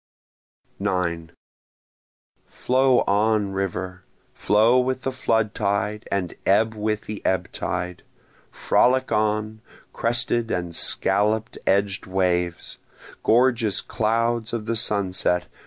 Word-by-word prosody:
9 85 -3 -2 1.2
Flow 130 0 +2
on, 105 0 +1
river! 95 -1 -4 0.3
flow 110 +5 +3
with 130 +1 -1
the 135 - -1
flood 110 -4 0
tide, 100 +1 -2
and 95 -3 -2
ebb 110 +3 +3
with 105 0 -2
the 105 -1 -8
ebb 90 -2 -1
tide! 90 0 -4 0.5
Frolic 130 +1 +2
on, 110 0 0 0.3
crested 120 0 0
and 85 -1 -3
scallop 105 +6 +1 0.2
edg'd 100 0 +1
waves! 90 -2 -1 0.4
Gorgeous 120 -3 +3
clouds 115 +1 -1
of 115 -2 -3
the 115 +1 -1
sunset! 95 -5 0
105 Hz, 105 wpm, -23 LUFS, 95-115 Hz, 1.2 s, flow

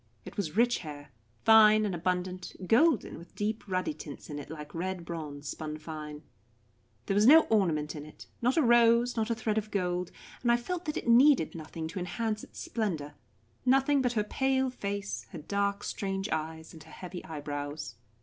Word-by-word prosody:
It - - -9
was 190 -4 -3
rich 240 +1 +3
hair, 145 -2 -9 0.4
fine 215 -1 +7
and 200 - -1
abundant, 180 +1 -2
golden, 240 - +3
with 170 +1 -15
deep 215 +1 -2
ruddy 185 +10 -1
tints 150 - -9
in 145 - -4
it 145 - -9
like 150 -1 -8
red 180 +1 -3
bronze 150 -4 -6
spun 155 -1 -5
fine. 155 -1 -8 0.8
There - - 0
was 205 +3 +4
no 315 +4 +10
ornament 160 -9 +1
in 150 0 -7
it, 155 - -13 0.2
not 250 +5 +2
a 320 - +5
rose, 235 0 +5
not 225 -1 0
a 230 - +1
thread 220 -1 0
of 215 0 -8
gold, 180 -3 -1 0.3
and 240 - +3
I 235 - +5
felt 350 +9 -4
that 300 - -2
it - - -5
needed 250 - +5
nothing 160 0 -6
to 180 - -5
enhance 215 +4 -2
its - - -13
splendour; 170 -11 -3 0.5
nothing 270 +2 +4
but 250 -2 +1
her 215 -3 +1
pale 265 +4 +1
face, 200 -3 -4
her - - -5
dark 200 +5 -1
strange 195 0 -3
eyes, 160 +1 -4
and 160 - -12
her 160 - -16
heavy 180 -1 -8
eyebrows. 145 -1 -5
195 Hz, 190 wpm, -30 LUFS, 160-230 Hz, 0.8 s, no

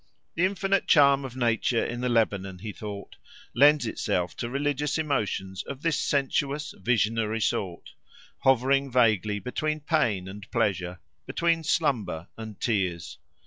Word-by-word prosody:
The 175 - +2
infinite 195 0 0
charm 140 -2 +5
of 130 -2 -7
nature 115 -1 +1
in 120 0 -4
the 125 - 0
Lebanon, 100 -5 0
he 105 +4 -6
thought, 100 -2 -8 0.4
lends 145 +2 +5
itself 90 -5 -2
to 120 - -3
religious 145 +2 -1
emotions 105 - -2
of 140 0 -8
this 165 -3 +1
sensuous, 140 +1 -1
visionary 110 +1 +1
sort, 95 -5 -2 0.5
hovering 135 +1 +2
vaguely 110 -4 +2
between 155 +9 -2
pain 120 - 0
and 100 +2 -10
pleasure, 90 -6 -1 0.3
between 170 -1 +1
slumber 115 - 0
and 110 -2 -9
tears. 90 -8 -2
120 Hz, 135 wpm, -27 LUFS, 100-145 Hz, 0.5 s, charm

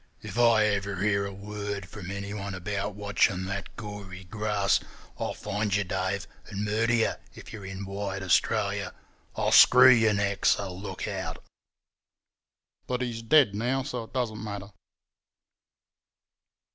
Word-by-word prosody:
If 120 - -5
I 115 -2 +5
ever 100 -1 0
hear 100 +1 +1
a - - -6
word 100 -1 -5
from 95 -2 -9
anyone 100 0 -5
about 100 +2 -3
watching 100 -2 +1
that 100 +1 -5
gory 100 -4 -8
grass, 105 +1 +1 0.4
I'll - - -2
find 105 0 -2
you, 100 - +2
Dave, 95 +1 -2 0.2
and 105 0 -4
murder 110 +3 +1
you, 115 - +2 0.2
if - - -11
you're 100 -4 -7
in 95 +1 -6
wide 100 0 -4
Australia. 95 - +1 0.4
I'll - - 0
screw 130 +1 +9
your 110 -3 +4
neck, 100 -1 -1
so 100 -2 +2
look 95 +3 -6
out.' - - -5 1.4
"But 125 0 -1
he's 115 -2 -4
dead 125 -2 +5
now, 125 +6 0
so 125 -4 -4
it - - -21
doesn't 115 -5 -2
matter." 100 -1 -6
100 Hz, 145 wpm, -28 LUFS, 100-110 Hz, 1.4 s, screw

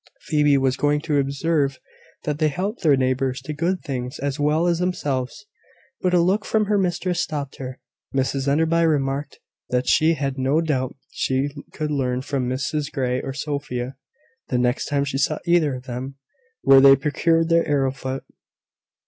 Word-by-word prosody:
Phoebe 150 -2 +3
was 130 -1 +1
going 145 +1 +2
to 150 -2 +1
observe 140 0 0 0.5
that 150 -1 -2
they 155 - +3
helped 195 - -3
their 150 -6 +4
neighbours 130 0 0
to 155 - -5
good 170 +4 -1
things 125 0 -4
as 140 +1 -3
well 150 +3 +2
as 170 -1 +1
themselves; 150 -1 -2 0.6
but 180 - +1
a - - +5
look 190 +5 +2
from 215 -1 +1
her 205 0 +2
mistress 180 -1 0
stopped 145 -5 -4
her. 130 -1 -7 0.3
Mrs 135 0 -1
Enderby 165 +4 +2
remarked 145 -2 0 0.3
that 125 0 0
she 160 +5 +4
had 135 -2 -3
no 135 +4 +2
doubt 135 -6 -1 0.2
she 135 +2 0 0.2
could 155 -1 -3
learn 130 -3 -1
from 135 -3 -2
Mrs 145 +3 -2
Grey 130 -3 -1
or 135 - -4
Sophia, 135 -3 -4 0.5
the 125 - 0
next 125 +1 0
time 140 -1 0
she 135 -1 -2
saw 150 +2 +1
either 170 -6 +3
of 125 - -8
them, 130 +2 -6 0.5
where 135 -1 +7
they 135 0 +9
procured 165 +4 +1
their 165 0 +3
arrowroot. 135 -2 -1
140 Hz, 170 wpm, -23 LUFS, 130-160 Hz, 0.6 s, they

